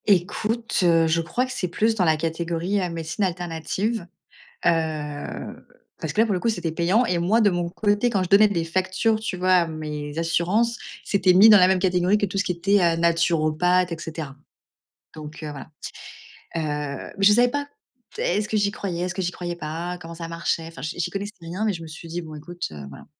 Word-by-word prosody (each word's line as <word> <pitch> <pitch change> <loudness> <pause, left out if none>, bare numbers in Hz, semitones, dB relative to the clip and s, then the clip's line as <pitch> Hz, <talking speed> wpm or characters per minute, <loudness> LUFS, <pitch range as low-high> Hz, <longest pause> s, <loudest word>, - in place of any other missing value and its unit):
Écoute, 210 +4 +1
heu, 165 -2 +4
je 165 +1 +2
crois 240 +10 -1
que 260 - -8
c'est 195 -7 -2
plus 215 +6 +1
dans 195 -5 +1
la 160 -1 +3
catégorie 170 +4 -1
à 180 - -1
médecines 165 +3 -3
alternatives, 180 +3 -2 0.6
heu, 155 -3 -2 0.5
parce 160 - -3
que, - - +2
là, - - +2
pour 215 - -1
le 180 - -1
coup, 235 - 0
c'était 175 -7 -3
payant 180 +9 +2
et 180 - 0
moi, 190 +7 +2
de 210 - +5
mon 175 -1 -1
côté, 205 +4 +1
quand 200 -5 +1
je 185 - -3
donnais 205 +3 +6
des 170 -5 -1
factures, 185 +6 0
tu 220 -4 -3
vois, 185 +1 +2
à 180 -2 +5
mes 150 -1 -5
assurances, 180 +8 +1 0.3
c'était 190 -2 +3
mis 200 +5 +8
dans 210 - +10
la 180 -1 +6
même 190 0 +3
catégorie 180 +1 +2
que 210 - 0
tout 195 - -6
ce 200 - +1
qui 180 - 0
était, 195 +4 +2
heu, 170 -1 +3
naturopathe 170 +1 +2
et - - -2
cetera 155 -4 -6 0.8
donc 155 +1 -9
heu, 155 - -4
voilà. 140 -2 -9 0.9
Heu 150 -3 -3
mais 195 - +1
je 205 - +8
savais 240 +3 +5
pas. 285 +3 -2 0.6
Heu, - - -1
est-ce 205 +4 0
que 220 - -1
j'y 205 -1 +2
croyais? 180 -4 -4
Est-ce 180 0 -3
que 190 - -2
j'y 180 0 -1
croyais 175 -1 -5
pas? 170 +3 -5
Comment 165 0 -9
ça 165 0 -7
marchait? 165 0 -2
Enfin, 165 -5 -11
j'y 155 +4 -5
j'y 165 - -1
connaissais 205 +1 -4
rien, 170 +5 -4
mais 215 - +2
je 170 -3 -7
me 165 - -8
suis 160 +2 -10
dit: 170 +2 -3
«Bon, 155 -2 -9
écoute, 175 +4 -6
heu, 75 -2 -8
voilà». 70 - -12
175 Hz, 225 wpm, -24 LUFS, 165-200 Hz, 0.9 s, dans